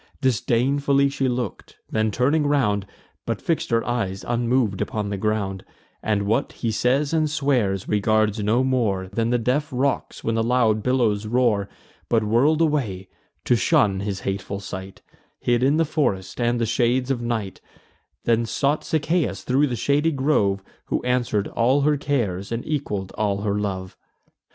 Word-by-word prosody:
Disdainfully 135 +3 +2
she 135 -1 -1
look'd; 125 -1 -4 0.2
then 110 0 +1
turning 145 +7 +1
round, 105 -9 +1 0.4
But - - -1
fix'd 165 - -1
her 115 -1 +1
eyes 100 -6 -2
unmov'd 120 -3 +1
upon 105 -2 -2
the - - -1
ground, 100 -2 -1 0.4
And 105 -2 0
what 110 +3 0
he 115 - -2
says 135 +7 +1
and 155 -2 +2
swears, 125 -10 0
regards 110 +1 +2
no 110 +5 +2
more 110 -8 0
Than 115 +3 -1
the 120 - +2
deaf 130 +6 0
rocks, 130 +1 -1
when 115 - 0
the 115 - +1
loud 115 -2 +2
billows 110 -4 +1
roar; 110 -4 +1 0.4
But 115 -2 +2
whirl'd 130 +9 +3
away, 115 - 0 0.4
to 125 - +4
shun 100 -2 +2
his 100 -1 -3
hateful 100 0 -3
sight, 95 -1 -8 0.4
Hid 120 -1 +1
in 140 +4 +3
the 165 - +3
forest 125 - -1
and 120 0 +1
the 115 - +1
shades 125 +3 +1
of 125 -3 -1
night; 115 -5 -3 0.6
Then 115 0 +2
sought 145 +5 0
Sichaeus 155 - 0
thro' 135 +4 +2
the 125 - -2
shady 145 +7 +1
grove, 120 -9 +1 0.2
Who - - -2
answer'd 120 -5 0
all 130 +5 +2
her 150 +1 +3
cares, 115 -10 -2
and 115 +1 -3
equal'd 105 -11 -3
all 100 -2 0
her 105 0 0
love. 95 -2 -4
120 Hz, 160 wpm, -23 LUFS, 105-135 Hz, 0.6 s, to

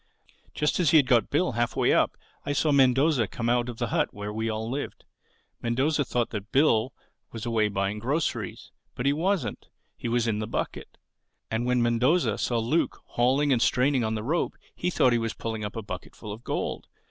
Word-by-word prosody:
Just 150 +3 +1
as 170 -5 +3
he 160 - +6
had 145 - +5
got 125 -3 +3
Bill 175 +3 +1
halfway 120 0 +1
up - - +2 0.3
I 145 - -2
saw 150 +2 +2
Mendoza 135 -2 +4
come 115 +3 -3
out 120 0 +1
of 120 - -7
the 120 -1 -2
hut - - +1
where 105 +1 -6
we 110 +1 -2
all 110 0 -3
lived. 135 +4 -5 0.6
Mendoza 135 +6 +1
thought 120 -3 -1
that 105 0 -6
Bill 130 -4 +3 0.4
was 115 0 -6
away 115 -2 +2
buying 100 +1 -2
groceries. 125 - -2 0.2
But 125 - -4
he 140 - +4
wasn't: 165 - -1 0.3
he - - -5
was 120 0 +1
in 105 -2 0
the 110 - -3
bucket. - - -4 0.5
And 115 +2 -1
when 125 -1 +2
Mendoza 125 +9 +2
saw 120 - 0
Luke 120 +9 0
hauling 135 +4 +2
and 120 - +1
straining 130 +1 +2
on 110 0 -1
the 105 - -3
rope 160 +8 -1 0.2
he 180 - -1
thought 130 -8 +3
he 120 - +2
was 115 0 -3
pulling 110 -1 -4
up 105 - -5
a 115 - -4
bucketful 105 +2 -8
of 110 +3 -11
gold. - - -3
120 Hz, 200 wpm, -27 LUFS, 110-140 Hz, 0.6 s, he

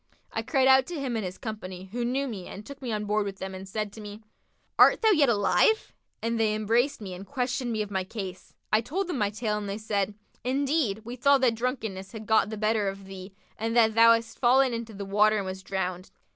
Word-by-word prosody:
I - - -2
cried 265 -4 +2
out 265 0 +6
to 345 -4 -5
him 260 -4 -2
and 220 - -1
his 185 0 -5
company 190 -4 -7
who 240 +2 -2
knew 265 +3 0
me 200 -7 -6
and 205 - -9
took 280 +2 -10
me 250 -3 -4
on 210 -1 -2
board 210 +1 +1
with 200 -1 -5
them 190 0 -6
and 190 +1 -8
said 210 0 -3
to 220 - -10
me, 210 +1 -9 0.6
'Art - - +6
thou 440 - +6
yet 300 -9 +4
alive?'; 210 - +2 0.3
and 230 0 0
they 215 -1 +2
embraced 230 +5 +1
me 190 -3 -6
and 180 +2 -8
questioned 250 +1 -2
me 215 -1 0
of 205 - -10
my 190 -1 -1
case. 190 -2 -8 0.2
I 215 - +5
told 360 - -2
them 345 -8 -3
my 205 -1 +2
tale 210 0 -2
and 205 -1 -5
they 200 - -3
said, 205 -2 -1 0.3
'Indeed, 265 -4 0
we 240 +2 -6
thought 280 +2 +4
that 250 -3 +4
drunkenness 225 -5 -4
had 220 -1 -7
gotten 220 -1 +3
the 220 - -5
better 215 -1 +1
of 195 0 -5
thee 190 0 -10 0.2
and 225 +2 -1
that 220 -2 +5
thou 230 +1 +7
hadst 230 0 -3
fallen 260 +1 +4
into 230 -2 -5
the 200 0 -5
water 210 +2 +3
and 200 - -2
wast 190 0 -6
drowned.' 185 -1 -3
220 Hz, 240 wpm, -27 LUFS, 200-245 Hz, 0.6 s, thou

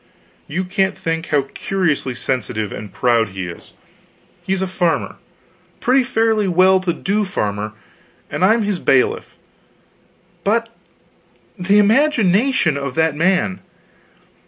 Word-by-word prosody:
You 175 +5 -2
can't 190 +1 -1
think 165 0 -3
how 145 -2 +2
curiously 155 -9 -1
sensitive 110 -5 -2
and 105 -1 -7
proud 115 -3 +1
he 95 -1 -5
is. 85 - -11 0.7
He's 190 0 -1
a - - -2
farmer 180 -2 -1 0.6
pretty 260 +2 +3
fairly 225 -4 +1
well 185 +1 +4
to 185 -1 -1
do 200 +5 -1
farmer 105 - -3 0.5
and - - -3
I'm 220 +4 +4
his 205 -3 -1
bailiff; 130 -4 +1 1.1
but 230 +4 +1 0.9
the 200 +1 +2
imagination 220 - +3
of 140 -2 -4
that 160 -2 +1
man! 185 +3 +1
185 Hz, 120 wpm, -19 LUFS, 140-205 Hz, 1.1 s, well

